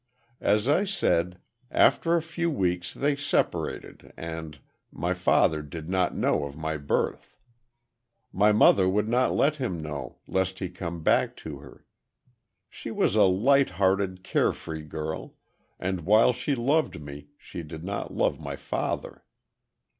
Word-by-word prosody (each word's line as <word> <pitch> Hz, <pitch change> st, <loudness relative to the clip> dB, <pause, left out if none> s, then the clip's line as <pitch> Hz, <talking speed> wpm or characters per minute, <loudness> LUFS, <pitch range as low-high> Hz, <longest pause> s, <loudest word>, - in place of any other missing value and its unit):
"As 105 Hz, +3 st, +2 dB
I 150 Hz, +7 st, +3 dB
said, 90 Hz, -, 0 dB, 0.3 s
after 170 Hz, 0 st, +3 dB
a 165 Hz, -, +1 dB
few 170 Hz, +1 st, -2 dB
weeks 90 Hz, -, -1 dB
they 145 Hz, +1 st, 0 dB
separated, 145 Hz, 0 st, -2 dB
and—my 80 Hz, -3 st, -6 dB
father 75 Hz, -1 st, +2 dB
did 75 Hz, +2 st, -8 dB
not 95 Hz, -2 st, +1 dB
know -, -, +1 dB
of 70 Hz, 0 st, -8 dB
my 80 Hz, 0 st, -2 dB
birth. 70 Hz, -1 st, -2 dB, 1.0 s
My 105 Hz, +3 st, +4 dB
mother 100 Hz, -3 st, +5 dB
would 105 Hz, +3 st, +1 dB
not 125 Hz, +3 st, +2 dB
let 150 Hz, +2 st, +2 dB
him 110 Hz, -, -3 dB
know, 75 Hz, -2 st, -6 dB
lest 95 Hz, 0 st, -1 dB
he 95 Hz, -2 st, -4 dB
come 85 Hz, -2 st, -6 dB
back -, -, +2 dB
to 75 Hz, -3 st, -6 dB
her. 70 Hz, -1 st, -15 dB, 0.8 s
She -, -, -9 dB
was 95 Hz, -, +1 dB
a 105 Hz, -2 st, +6 dB
light 130 Hz, +9 st, +4 dB
hearted, 95 Hz, -1 st, +1 dB
carefree 80 Hz, -4 st, -1 dB
girl, 80 Hz, +1 st, -5 dB, 0.4 s
and 95 Hz, -1 st, -2 dB
while 110 Hz, +8 st, +5 dB
she 140 Hz, +4 st, -1 dB
loved 140 Hz, -, +1 dB
me, 75 Hz, 0 st, -9 dB
she -, -, -8 dB
did 80 Hz, 0 st, -9 dB
not 100 Hz, +2 st, -4 dB
love -, -, 0 dB
my -, -, -5 dB
father. -, -, -4 dB
95 Hz, 145 wpm, -27 LUFS, 80-120 Hz, 1.0 s, a